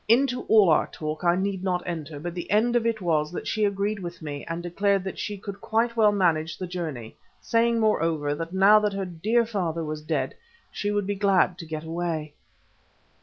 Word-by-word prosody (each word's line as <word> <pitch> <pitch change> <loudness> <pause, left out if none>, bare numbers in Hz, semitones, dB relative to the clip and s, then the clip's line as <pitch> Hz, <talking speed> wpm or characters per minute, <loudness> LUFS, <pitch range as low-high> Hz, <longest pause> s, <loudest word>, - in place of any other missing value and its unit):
Into 250 +2 +3
all 210 -6 +6
our 155 - +3
talk 155 +1 -5
I 175 0 +4
need 190 0 -2
not 180 -2 0
enter, 160 -4 -5
but 170 +3 -5
the 175 -1 -6
end 225 +4 +3
of 230 -1 +2
it 225 -2 -1
was 155 -3 +1
that - - -5
she 215 -1 +1
agreed 200 +1 -1
with 175 -2 -7
me, 145 -3 -6
and 170 +1 -4
declared 195 +2 +1
that 190 - -6
she 205 -1 -3
could 200 0 -8
quite 230 +1 0
well 215 -2 +5
manage 165 -5 +1
the 185 - -4
journey, 160 -10 -5 0.2
saying, 230 0 +2
moreover, 165 -9 +1
that 165 +3 -5
now 195 +3 +6
that 210 -1 0
her 195 -1 -2
dear 210 +7 +1
father 175 -7 -2
was 155 0 -4
dead 155 - -2 0.4
she 205 - -2
would 205 -1 0
be 205 - -1
glad 195 -2 +2
to 165 - -8
get 155 -1 -5
away. 160 -2 -3
185 Hz, 210 wpm, -26 LUFS, 165-210 Hz, 0.4 s, all